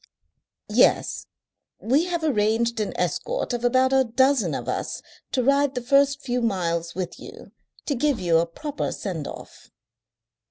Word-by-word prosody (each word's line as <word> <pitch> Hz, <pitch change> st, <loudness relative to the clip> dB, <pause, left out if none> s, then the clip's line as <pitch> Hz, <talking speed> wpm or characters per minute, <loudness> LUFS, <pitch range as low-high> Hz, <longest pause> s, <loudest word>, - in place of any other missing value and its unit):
"Yes. -, -, +3 dB, 0.5 s
We 275 Hz, +9 st, +2 dB
have 345 Hz, -2 st, -2 dB
arranged 230 Hz, -3 st, +1 dB
an 210 Hz, -, -1 dB
escort -, -, -2 dB
of 240 Hz, 0 st, -3 dB
about 260 Hz, +2 st, +3 dB
a 265 Hz, 0 st, +5 dB
dozen 260 Hz, +1 st, +2 dB
of -, -, -5 dB
us -, -, -3 dB, 0.3 s
to 255 Hz, -, +1 dB
ride 280 Hz, +1 st, +2 dB
the 250 Hz, -, -2 dB
first 280 Hz, +2 st, +3 dB
few 245 Hz, -1 st, -1 dB
miles 170 Hz, -6 st, -1 dB
with 185 Hz, -2 st, -5 dB
you, -, -, -12 dB, 0.3 s
to 290 Hz, -, 0 dB
give 280 Hz, 0 st, 0 dB
you 170 Hz, -2 st, +3 dB
a 170 Hz, -, 0 dB
proper 295 Hz, -, -4 dB
send 170 Hz, -8 st, -5 dB
off." -, -, -11 dB
250 Hz, 155 wpm, -24 LUFS, 210-280 Hz, 0.5 s, a